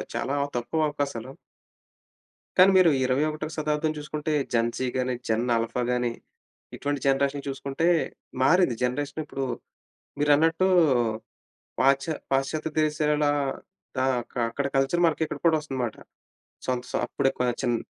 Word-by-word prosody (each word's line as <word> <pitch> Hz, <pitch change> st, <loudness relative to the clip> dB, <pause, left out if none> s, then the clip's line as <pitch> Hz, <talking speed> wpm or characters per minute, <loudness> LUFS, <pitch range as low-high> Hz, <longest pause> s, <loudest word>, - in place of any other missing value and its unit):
చాలా 140 Hz, -, -1 dB, 0.2 s
తక్కువ 155 Hz, +6 st, 0 dB
అవకాశాలు. 140 Hz, -4 st, -4 dB, 1.3 s
కానీ 190 Hz, +2 st, +8 dB
మీరు 180 Hz, -3 st, +6 dB, 0.2 s
21వ 155 Hz, +4 st, 0 dB
శతాబ్దం 155 Hz, 0 st, 0 dB
చూసుకుంటే, 150 Hz, +1 st, -3 dB, 0.2 s
జెన్‌ 115 Hz, 0 st, +2 dB
జీ 130 Hz, -, -1 dB
గాని, 130 Hz, 0 st, 0 dB
జెన్ 110 Hz, +1 st, +1 dB
ఆల్ఫా 115 Hz, +2 st, -1 dB
గాని, 125 Hz, -1 st, 0 dB, 0.6 s
ఇటువంటి 145 Hz, -1 st, -2 dB
జనరేషన్ 140 Hz, +1 st, +1 dB
చూసుకుంటే 140 Hz, +4 st, -2 dB, 0.6 s
మారింది 180 Hz, -9 st, +4 dB
జనరేషన్. 145 Hz, +5 st, -2 dB
ఇప్పుడు 135 Hz, -2 st, -4 dB, 0.8 s
మీరన్నట్టు 160 Hz, +5 st, +3 dB, 1.1 s
పాశ్చ 135 Hz, +1 st, +4 dB, 0.3 s
పాశ్చాత్య 145 Hz, +4 st, 0 dB
దేశాలలో 150 Hz, -1 st, +1 dB, 0.7 s
ఆహ్, 125 Hz, -2 st, +1 dB, 0.3 s
అక్కడ 140 Hz, +4 st, -2 dB
కల్చర్ 135 Hz, +6 st, +2 dB
మనకి 160 Hz, 0 st, 0 dB
ఇక్కడ -, -, -6 dB
కూడా 160 Hz, -1 st, +5 dB
వస్తుంది 135 Hz, -3 st, -6 dB
మాట. 115 Hz, -, -4 dB, 0.7 s
సంత్ 125 Hz, -1 st, -2 dB
సొ -, -, -1 dB
అప్పుడే 135 Hz, +2 st, +1 dB
క్వచెన్ 120 Hz, -1 st, 0 dB
140 Hz, 120 wpm, -26 LUFS, 130-155 Hz, 1.3 s, కానీ